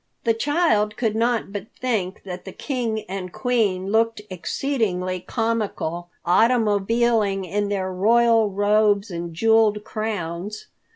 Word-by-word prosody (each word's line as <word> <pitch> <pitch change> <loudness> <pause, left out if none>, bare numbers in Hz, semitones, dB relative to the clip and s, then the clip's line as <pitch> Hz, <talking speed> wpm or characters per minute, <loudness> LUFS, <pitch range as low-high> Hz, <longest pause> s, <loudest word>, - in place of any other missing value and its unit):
The 230 - +3
child 225 -5 +1
could 225 -3 0
not 230 -2 0
but 205 0 -5
think 215 -8 -2
that 180 -1 -7
the 190 - -8
King 235 -3 -3
and 185 -1 -5
Queen 200 -7 0
looked 225 0 +2
exceedingly 185 -3 -1
comical 205 -6 -2 0.2
automobiling 215 0 +2
in 200 +3 -1
their 190 -2 -2
royal 225 +3 +4
robes 205 0 +2
and 170 0 -5
jeweled 215 +3 +3
crowns. 205 -2 -4
210 Hz, 120 wpm, -23 LUFS, 190-230 Hz, 0.2 s, royal